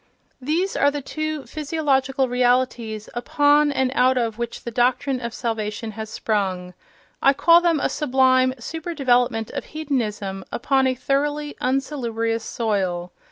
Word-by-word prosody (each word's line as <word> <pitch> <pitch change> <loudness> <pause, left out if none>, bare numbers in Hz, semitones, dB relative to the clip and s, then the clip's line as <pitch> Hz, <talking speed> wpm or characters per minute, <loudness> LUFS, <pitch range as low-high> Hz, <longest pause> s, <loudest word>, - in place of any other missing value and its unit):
These 330 +8 -1
are 285 - +4
the 285 -1 -4
two 310 0 -4
physiological 275 -4 0
realities 245 -3 0
upon 290 +4 +3
and 265 -2 0
out 255 0 +3
of 230 -2 -1
which 235 -1 -4
the 235 - -5
doctrine 255 +2 +1
of 235 -1 -4
salvation 220 -1 -3
has 220 0 -7
sprung. 190 -5 -2 0.5
I 275 - +5
call 335 +5 +5
them 335 -3 +2
a - - +1
sublime 260 -2 +2
super 325 +7 -6
development 245 -5 +1
of - - -5
hedonism 210 -10 -2
upon 265 +1 +1
a 255 - 0
thoroughly 290 +3 -1
unsalubrious 235 -4 -1
soil. 190 -7 -2
255 Hz, 140 wpm, -22 LUFS, 225-285 Hz, 0.5 s, I